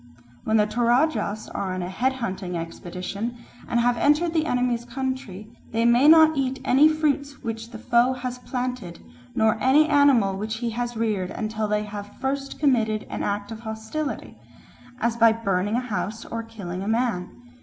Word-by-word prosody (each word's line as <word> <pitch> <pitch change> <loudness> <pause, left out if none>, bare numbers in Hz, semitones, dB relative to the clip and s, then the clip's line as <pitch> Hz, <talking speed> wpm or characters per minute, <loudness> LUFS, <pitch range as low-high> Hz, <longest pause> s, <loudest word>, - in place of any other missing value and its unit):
When 220 0 +3
the 210 - +4
Toradjas 240 0 +1
are 190 -2 -3
on 185 - -3
a - - -3
head 255 +8 0
hunting 190 -8 -4
expedition 185 +7 -5 0.3
and 235 - +1
have 240 0 +2
entered 305 +6 +3
the 320 -1 +1
enemy's 245 -2 0
country, 240 -5 -5 0.2
they 230 +1 +2
may 240 +4 +5
not 315 0 +7
eat 265 -1 -1
any 275 +4 +6
fruits 285 -2 -1
which 225 0 -5
the 235 - -8
foe 240 +3 +3
has 250 0 -5
planted 250 -7 -4 0.4
nor 220 0 +2
any 285 +4 +5
animal 280 -10 +4
which 215 +2 -3
he 235 0 -2
has 240 0 -3
reared 210 -5 -1
until 215 -1 -3
they 210 0 0
have 205 0 -8
first 275 +1 -3
committed 225 -7 +2
an - - -3
act 205 +1 -2
of 220 - -6
hostility, 220 +7 -5 0.6
as 235 0 0
by 230 -1 +6
burning 205 -2 0
a - - +2
house 225 -2 -4
or 230 - -4
killing 200 -6 -7
a 195 - -4
man. 225 -5 0
230 Hz, 175 wpm, -24 LUFS, 210-260 Hz, 0.6 s, not